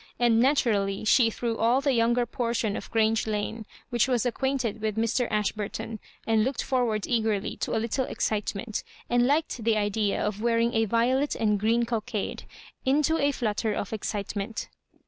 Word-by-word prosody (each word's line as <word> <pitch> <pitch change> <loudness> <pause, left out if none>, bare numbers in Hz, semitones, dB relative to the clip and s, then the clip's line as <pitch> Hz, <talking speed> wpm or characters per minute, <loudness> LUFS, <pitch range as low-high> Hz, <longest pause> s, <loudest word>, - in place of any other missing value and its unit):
And, 235 -2 +3
naturally, 220 -7 +2
she 230 +1 +5
threw 230 0 -3
all 235 +3 +3
the 275 -1 +1
younger 240 +1 +2
portion 235 -3 -1
of - - -6
Grange 220 -1 +2
Lane, 215 +1 -3 0.2
which 240 +1 +2
was 250 -3 +1
ac 245 - +2
quainted 255 -5 -1
with 215 -1 -2
Mr. 230 +2 +1
Ashburton, 210 +1 -2 0.3
and 220 -1 +3
looked 260 +2 -1
for 255 -2 +1
ward 215 -3 -1
eagedy 220 -4 0
to - - -1
a - - +2
little 235 +4 -1
excitement 215 0 -2 0.3
and 245 0 +4
liked 290 -4 0
the 225 -1 +2
idea 205 0 0
of 210 0 -2
wearing 235 0 +2
a 225 0 +2
violet 250 +6 +1
and 210 -2 +1
green 230 +3 +2
cockade, 230 -2 -3 0.4
into 300 +4 +2
a 285 0 +3
flutter 220 -4 -1
of 200 - -4
excitement. 205 0 -4
225 Hz, 170 wpm, -27 LUFS, 215-245 Hz, 0.4 s, she